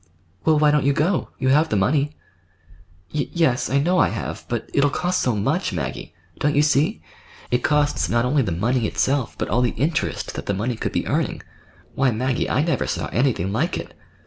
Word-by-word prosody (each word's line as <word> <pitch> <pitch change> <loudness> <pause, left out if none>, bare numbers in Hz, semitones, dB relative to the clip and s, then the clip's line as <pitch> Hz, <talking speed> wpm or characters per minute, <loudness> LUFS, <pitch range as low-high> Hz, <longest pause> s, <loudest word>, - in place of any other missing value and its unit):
"Well, 160 -1 +4
why 150 0 +4
don't 150 -1 +2
you 140 +1 +3
go? 165 +6 0
You 130 - 0
have 150 +4 +4
the - - 0
money." 140 +9 +2 1.0
"Y 150 -2 -1
yes, 160 -8 +1
I 135 - +2
know 175 +6 +2
I - - +4
have; - - -5
but - - -3
it'll 145 0 +3
cost 180 +5 -1
so 125 -3 +1
much, 135 - 0
Maggie. 80 -7 -5 0.2
Don't 145 0 +1
you 145 - +4
see? 140 - +1 0.5
It 125 - +3
costs 150 +1 +1
not 120 +1 +2
only 140 +3 +2
the 105 -8 -1
money 115 +7 0
itself, 135 0 0
but - - -2
all 120 - +1
the 125 - +2
interest 155 +7 -1
that - - -7
the 100 - 0
money 115 +5 -1
could - - -3
be - - -1
earning. - - -1 0.5
Why, 135 0 +2
Maggie, 125 +2 -1
I 145 - +2
never 165 -5 0
saw - - -2
anything 115 -7 0
like 110 - 0
it." - - -7
135 Hz, 205 wpm, -22 LUFS, 120-150 Hz, 1.0 s, Well